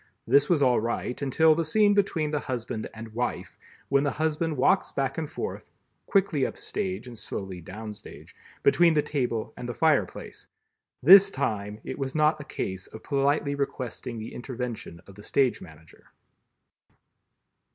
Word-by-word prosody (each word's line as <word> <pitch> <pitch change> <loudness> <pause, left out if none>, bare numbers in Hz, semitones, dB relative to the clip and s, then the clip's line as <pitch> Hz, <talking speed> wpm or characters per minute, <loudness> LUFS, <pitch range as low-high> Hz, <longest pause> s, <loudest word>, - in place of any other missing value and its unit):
This 140 +4 +4
was 160 -5 +3
all 125 -2 +4
right, 120 +3 -3
until 155 +4 +4
the 165 +2 0
scene 205 +6 +3
between 170 -7 +1
the 150 - 0
Husband 120 -4 -4
and 110 0 -9
Wife, 120 +2 -3 0.3
when 140 0 +3
the 145 - +1
Husband 155 +1 -1
walks 130 - +3
back 135 +2 -2
and 155 -2 -4
forth 435 - -6 0.4
(quickly 190 -8 +2
up - - -2
stage 95 +4 -3
and 125 -1 -9
slowly 95 -2 -6
down 105 +5 -7
stage), - - -13 0.3
between 165 +3 +5
the 150 - +3
table 120 -6 -2
and 125 - -6
the 120 - -4
fire 155 -3 +3
place. - - -10 0.6
This 195 +6 +9
time 105 - -3
it - - -6
was 135 0 -3
not 155 0 +3
a - - -9
case 95 -9 -4
of 110 - -12
politely 140 0 +1
requesting 130 -3 -4
the 110 0 -7
intervention 120 -9 -6
of 100 - -14
the 105 - -13
stage 130 +4 +1
manager. 80 -2 -15
135 Hz, 165 wpm, -27 LUFS, 115-155 Hz, 0.6 s, This